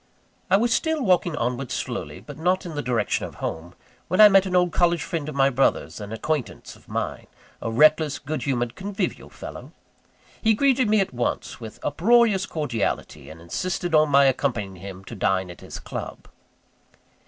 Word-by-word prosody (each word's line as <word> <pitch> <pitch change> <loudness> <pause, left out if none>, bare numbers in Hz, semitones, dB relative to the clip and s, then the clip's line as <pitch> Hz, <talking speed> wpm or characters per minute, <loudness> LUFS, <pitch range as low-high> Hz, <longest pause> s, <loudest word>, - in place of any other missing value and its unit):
I 190 - +5
was 230 +2 +2
still 320 -3 0
walking 180 -5 +2
onward 125 0 -2
slowly, - - -4
but 145 - -10
not 180 +3 +1
in 170 - -6
the 145 - -2
direction 120 -6 0
of - - -13
home, 85 +2 -5 0.3
when 185 - -1
I 210 -1 +10
met 195 -1 +5
an 180 - -2
old 180 -1 +3
college 175 -1 +2
friend 160 -4 -3
of 150 - -7
my 135 0 +4
brother's, 135 -2 +1
and 105 0 -7
an 115 - -4
acquaintance 150 0 -3
of - - -21
mine - - -4 0.3
a - - -2
reckless, 155 +4 +4
good 155 +2 -4
humoured, 120 -4 -1
convivial 195 +1 -4
fellow. - - -10 0.7
He 220 -1 +4
greeted 260 -1 +3
me 215 -1 +4
at 190 - -2
once, 120 0 -3
with 110 -2 -9
uproarious 205 +5 +3
cordiality; 125 -10 -3
and 80 - -11
insisted 175 - -3
on 155 -1 +5
my 140 0 +6
accompanying 115 -8 0
him 95 +1 -9
to - - -9
dine 95 -2 0
at 85 - -13
his - - -8
club. - - -7
155 Hz, 185 wpm, -24 LUFS, 120-185 Hz, 0.7 s, I